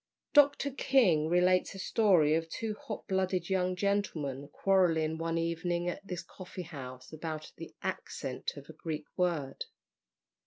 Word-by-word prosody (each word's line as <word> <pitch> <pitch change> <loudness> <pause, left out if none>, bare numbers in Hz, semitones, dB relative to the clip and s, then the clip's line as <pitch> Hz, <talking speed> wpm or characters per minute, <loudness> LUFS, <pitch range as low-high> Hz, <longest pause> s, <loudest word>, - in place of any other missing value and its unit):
Dr. 285 -1 +5
King 200 - +3
relates 180 +2 +3
a - - -7
story 185 -7 +4
of 165 0 0
two 220 +5 -3
hot - - -7
blooded 185 -1 0
young 185 -1 +1
gentlemen 170 -9 -1
quarrelling 160 -2 +2
one 165 0 -1
evening 170 +1 -1
at 175 - -3
this 180 -2 -4
coffee 185 +1 -8
house 130 -5 -9
about 155 -1 -5
the - - -9
accent - - -4
of - - -10
a - - -10
Greek 155 -2 -5
word. 165 -7 -1
175 Hz, 145 wpm, -31 LUFS, 160-190 Hz, -, Dr